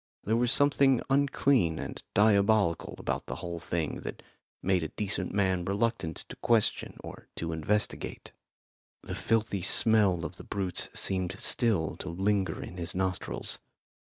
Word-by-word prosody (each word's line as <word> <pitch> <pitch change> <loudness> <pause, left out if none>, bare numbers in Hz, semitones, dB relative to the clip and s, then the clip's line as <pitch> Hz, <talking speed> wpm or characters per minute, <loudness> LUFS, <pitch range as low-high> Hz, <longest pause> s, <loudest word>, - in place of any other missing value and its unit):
There 110 - +1
was 120 +1 +2
something 140 -3 +4
unclean 135 - +3
and - - -6
diabolical 100 -3 +3
about - - -3
the - - -4
whole 85 -1 -5
thing 80 -2 -2
that - - -7 0.4
made 95 -1 +2
a 80 - -2
decent 95 +1 -2
man 95 -3 +1
reluctant 100 -3 -1
to - - -7
question 115 -3 +1
or - - -10
to 80 0 -3
investigate. 90 +7 -2 0.7
The - - -6
filthy 110 -3 0
smell 95 -3 +4
of 90 - -6
the - - -9
brutes 95 -3 -3
seemed 95 -1 -1
still 105 -10 +1
to 90 - -6
linger 95 0 0
in 90 - -9
his 85 0 -5
nostrils. 95 -1 -2
95 Hz, 145 wpm, -29 LUFS, 85-110 Hz, 0.7 s, something